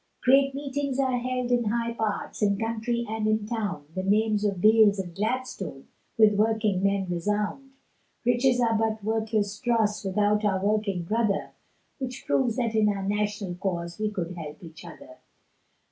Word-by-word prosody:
Great 270 +1 +4
meetings 280 -1 -3
are 260 -2 +1
held 250 0 -2
in 240 -1 +2
high 235 +2 -1
parts, 220 -2 -3
In 200 -1 +2
country 230 +2 -2
and 215 0 -2
in 215 -1 +1
town, 205 -9 -3
The 185 - -2
names 210 +2 +2
of 200 -3 0
Beales 215 0 +5
and 180 -3 -5
Gladstone, 250 +7 -4 0.3
With 215 -2 +6
working 215 -2 +1
men 195 0 +1
resound, 210 +9 -2 0.5
Riches 245 +1 +3
are 230 -2 +2
but 220 -1 0
worthless 215 -1 -1
dross, 225 -4 +1
Without 210 +2 +1
our 195 -2 +2
working 205 -4 0
brother, 215 +2 0 0.5
Which 255 -1 -5
proves 245 -4 +1
that 235 -3 -1
in 215 -1 +3
our 200 -1 -2
national 205 -2 -1
cause 175 -1 -3
We 215 0 0
could 180 -4 -4
help 155 -1 -8
each 165 -1 -11
other. 315 +3 -12
215 Hz, 160 wpm, -26 LUFS, 200-235 Hz, 0.5 s, With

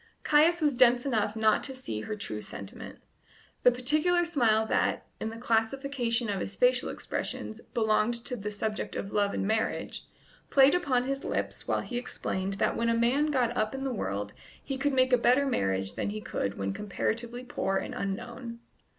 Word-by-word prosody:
Caius 325 +3 +4
was 295 -4 +2
dense 245 0 +5
enough 220 -5 0
not 220 -1 +3
to 265 - -3
see 110 - -4
her 215 - -4
true 110 - -5
sentiment. 100 -2 -8 0.6
The - - +7
particular 305 +8 +2
smile 230 -10 +3
that, - - 0
in 220 - -2
the 225 - -8
classification 235 +1 0
of 200 -2 -1
his - - -4
facial - - +3
expressions, 220 +1 -4
belonged 220 +1 +2
to 250 - -2
the 210 -3 -4
subject 210 +1 -3
of 200 - -4
love 205 -1 +1
and - - -1
marriage, 220 +2 -1 0.4
played 275 0 +6
upon 275 -9 +2
his 275 +1 -3
lips - - -3
while - - +1
he 245 -1 -4
explained 195 -5 -3
that 200 - +1
when 230 0 +1
a 230 - +2
man 255 +6 +3
got 250 -5 +1
up 215 +3 0
in 270 - -4
the 265 -2 -1
world 100 - -3 0.3
he 275 - -3
could 280 +1 0
make 255 -1 +3
a 250 - +6
better 250 +4 +4
marriage 95 - 0
than - - -2
he 215 +1 -4
could 100 - -3
when 95 0 -2
comparatively 235 - -3
poor 195 -5 -1
and - - -4
unknown. 235 +4 -5
235 Hz, 185 wpm, -29 LUFS, 210-265 Hz, 0.6 s, The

